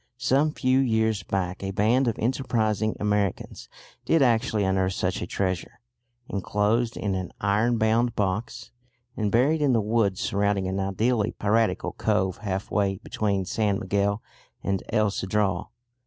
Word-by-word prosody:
Some 135 +6 +2
few 130 -2 +2
years 110 -4 +1
back 95 -2 -3
a 95 - -3
band 110 +7 +2
of 115 - 0
enterprising 110 -4 0
Americans 105 -2 -2 0.3
did 165 -3 +3
actually 115 -3 +2
unearth 95 0 +1
such 90 0 -2
a 90 - -3
treasure, 95 -1 -3 0.5
enclosed 105 +4 0
in 100 -2 -1
an 95 -1 -3
iron 105 +4 +2
bound 115 +2 +2
box, 100 +2 -2 0.4
and 105 -2 -1
buried 145 +7 +3
in 140 -3 +3
the 115 - +3
woods 105 -3 +1
surrounding 100 -1 0
an 95 +1 -2
ideally 105 +3 0
piratical 110 +2 +1
cove 95 -1 0
half 95 -1 -4
way 100 -2 +1
between 100 -3 -1
San 105 0 0
Miguel 100 0 -1 0.4
and 95 -1 -1
El 110 -2 +2
Cedral. 95 -2 -1
105 Hz, 145 wpm, -25 LUFS, 95-115 Hz, 0.5 s, did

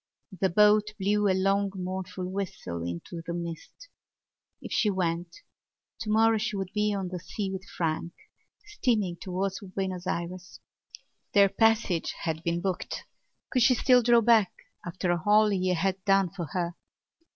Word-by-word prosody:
The 190 - +2
boat 210 +3 +4
blew 205 +2 +2
a 190 -1 +2
long 195 +1 +1
mournful 185 0 -4
whistle 185 - -4
into 85 - -6
the 170 +1 -4
mist. 170 - -7 0.7
If - - -9
she 215 - +2
went, 175 -3 -1 0.7
tomorrow 225 0 +3
she 210 - -2
would 195 -1 -4
be 210 0 +1
on 195 -3 -2
the 180 0 -5
sea 190 +3 -4
with 190 0 -5
Frank, 165 -2 -2 0.5
steaming 230 - 0
towards 190 +1 -2
Buenos 190 -2 -4
Ayres. 180 +2 -4 0.7
Their 200 -1 +6
passage 220 -6 +1
had 160 -1 -2
been 170 +1 -1
booked. 190 -1 -3 0.5
Could 255 - +2
she 250 +2 +5
still 250 +1 +5
draw 235 0 +5
back 225 -4 +4 0.3
after 175 +1 -1
all 210 +1 +5
he 185 -2 +1
had 190 +2 -1
done 195 -2 +3
for 180 -4 -5
her? 170 +3 -3
190 Hz, 150 wpm, -28 LUFS, 175-210 Hz, 0.7 s, Their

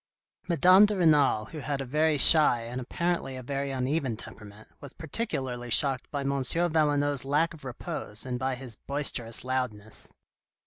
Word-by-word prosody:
Madame 185 +4 +6
de 210 -1 -1
Renal, 145 -10 +3
who 155 +8 -9
had 140 0 -3
a 135 - -4
very 150 +3 +1
shy, 145 -4 +5
and 125 +2 -5
apparently 170 +1 -2
a 130 - -8
very 140 +2 -3
uneven 130 -2 -1
temperament, 105 -1 -12
was 140 - -9
particularly 130 - -4
shocked 135 +2 +2
by 145 - -3
M. 140 - -2
Valenod's 145 -2 +1
lack 150 +5 +1
of 155 - -12
repose, 130 - -5
and 125 -1 -3
by 130 0 -1
his 125 -2 -3
boisterous 125 -4 -1
loudness. 125 -5 -3
135 Hz, 160 wpm, -28 LUFS, 125-155 Hz, -, Madame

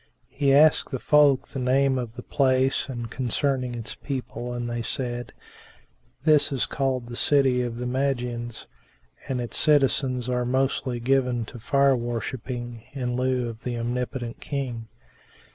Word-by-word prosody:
He 140 -1 +1
asked 150 +3 +5
the 130 - -2
folk 145 0 +4
the 135 - -5
name 130 +1 +2
of 120 -2 -5
the 125 - -8
place 130 -1 +1
and 120 -3 -4
concerning 130 0 -1
its 115 -1 -5
people 125 -3 -5
and 120 -1 -3
they 120 0 -3
said, 120 +1 -3 0.9
"This 150 -2 +4
is 135 -3 0
called 130 -3 -1
the 120 0 -8
City 135 -2 +3
of 120 -1 -3
the 125 - -4
Magians, 125 -3 -2 0.6
and 130 -2 -1
its 120 -1 0
citizens 135 -4 +2
are 125 -1 0
mostly 130 0 0
given 125 -1 +1
to 120 - -10
Fire 140 +4 +3
worshipping 120 0 -4
in 125 -3 -2
lieu 125 -1 0
of 115 -1 -8
the 120 -1 -3
Omnipotent 120 0 -3
King." 125 -6 -4
125 Hz, 150 wpm, -25 LUFS, 120-135 Hz, 0.9 s, asked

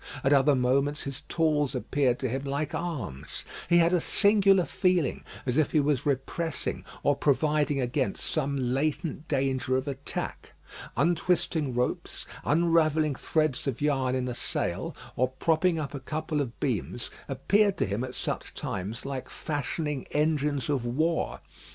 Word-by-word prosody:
At 135 - +4
other 140 +1 +5
moments 135 +4 +1
his 135 0 -5
tools 150 -4 +1
appeared 125 0 +1
to 130 - +1
him 130 +3 -2
like 140 +2 -2
arms. 125 - -4 0.2
He 175 - +6
had 170 +1 +5
a 175 - +3
singular 200 -2 +4
feeling, 180 -7 +1 0.2
as 125 +1 0
if 155 - +1
he 155 - +5
was 145 -2 +1
repressing 140 +3 -1 0.2
or 145 - +4
providing 150 0 +2
against 130 +1 -1
some 140 +1 -1
latent 145 +5 -1
danger 130 -2 +1
of 130 +2 -3
attack. 140 0 -5 0.4
Untwisting 160 -2 +1
ropes, 125 0 -2 0.2
unravelling 155 -2 +3
threads 155 0 0
of 130 -3 -1
yarn 135 -3 +1
in 130 -1 -1
a 125 - -2
sail, - - -2 0.2
or 130 - +3
propping 160 +6 +1
up 150 -3 -3
a 140 - -4
couple 155 +2 -2
of 120 -4 -5
beams, 120 -2 -2 0.2
appeared 200 +9 +2
to - - +2
him 100 +4 -2
at 130 0 -6
such - - -4
times 105 +7 -4
like 135 -2 -4
fashioning 150 -1 -3
engines 150 -3 +1
of 140 -4 0
war. 155 +8 0
145 Hz, 150 wpm, -28 LUFS, 130-155 Hz, 0.4 s, He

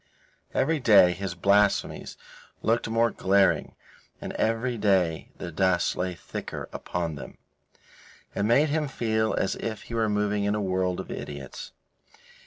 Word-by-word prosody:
Every 160 -1 +2
day 105 -8 +6
his 90 0 -4
blasphemies 100 +3 +1 0.5
looked 115 0 +1
more 115 0 +2
glaring, 95 0 +2 0.4
and - - -6
every 115 +3 0
day 95 -7 +1
the 90 - -6
dust 90 +1 +1
lay 90 0 -2
thicker - - -7
upon 85 -2 -3
them. 70 - -9 1.0
It - - -2
made 120 +9 +4
him 150 0 0
feel 110 -4 0
as 95 - 0
if 110 -3 -5
he - - -10
were 110 -2 +1
moving 105 0 0
in 100 +1 +1
a - - -1
world 95 -2 0
of - - -6
idiots. 70 -3 -7
100 Hz, 145 wpm, -26 LUFS, 90-115 Hz, 1.0 s, day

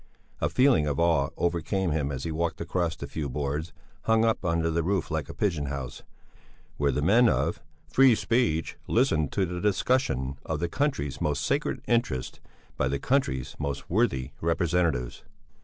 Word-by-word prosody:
A - - +1
feeling 130 - +4
of 70 0 -1
awe 80 -5 +3
overcame 85 +2 0
him 75 -2 0
as 65 -1 -4
he 80 - -3
walked 85 +1 -2
across 85 0 -1
the - - -6
few 70 0 -4
boards, 75 +4 -3 0.3
hung 110 0 +4
up 115 -3 +1
under 85 -2 +1
the 85 +1 +1
roof 95 +1 -1
like 80 -2 -2
a - - -6
pigeon 85 -9 0
house, 65 -3 -5 0.8
where 70 -1 +2
the 70 +2 -1
men 115 +8 +5
of - - 0 0.3
"free 135 -3 +5
speech 115 -9 0
listen 110 - +2
to 95 +4 0
the 90 0 -5
discussion 95 - +1
of 80 -2 -3
the 85 +1 -1
country's 80 - -1
most 75 -1 0
sacred 140 +2 -1
interests 115 - 0 0.4
by 65 - +1
the 70 +2 0
country's 70 - 0
most 70 -2 -4
worthy 65 -1 +1
representatives." 85 -6 0
80 Hz, 170 wpm, -27 LUFS, 70-100 Hz, 0.8 s, men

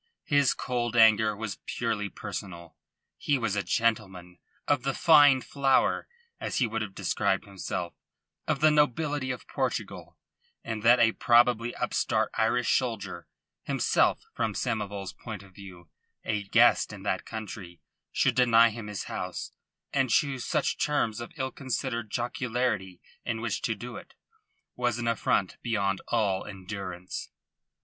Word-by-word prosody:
His 145 -3 +3
cold 120 -1 -2
anger 110 -2 +5
was 105 -3 -5
purely 105 -2 -2
personal. 90 -6 -7 0.4
He 145 - +1
was 115 -5 -1
a 105 - +1
gentleman 95 -6 -1 0.3
of 145 -3 +2
the 135 +1 -2
fine 145 -5 +6
flower, 135 -1 +1 0.3
as - - -3
he 130 - +3
would 115 0 -3
have 100 -3 -5
described - - 0
himself 90 -3 -5 0.5
of 135 - 0
the 155 0 +6
nobility 150 -1 +1
of 130 -2 -5
Portugal; - - -3 0.5
and 110 -2 -4
that 120 +3 +6
a 115 -1 +5
probably 120 0 +3
upstart - - 0
Irish 120 +2 +2
soldier 100 - -5 0.3
himself, - - +1
from 110 -3 -2
Samoval's 100 -5 -3
point 110 -5 -8
of 95 -1 -17
view, 90 -4 -13 0.3
a 105 -2 -1
guest - - +4
in - - -9
that - - -1
country 100 -6 -8 0.3
should - - +2
deny 115 -2 +5
him 110 -1 -7
his 105 -5 -4
house, - - -5 0.4
and 135 -2 +2
choose 135 0 +1
such - - 0
terms 120 -7 0
of 120 - -7
ill 130 -1 -2
considered 125 -3 -3
jocularity 120 -5 -2 0.2
in 115 -2 -2
which 115 -2 -2
to 115 -3 -1
do 120 +2 -8
it, - - -13 0.6
was 120 -2 0
an 120 0 -3
affront 105 -4 0
beyond 100 -5 0
all 100 -5 +1
endurance. 95 -2 -7
115 Hz, 145 wpm, -28 LUFS, 100-125 Hz, 0.6 s, fine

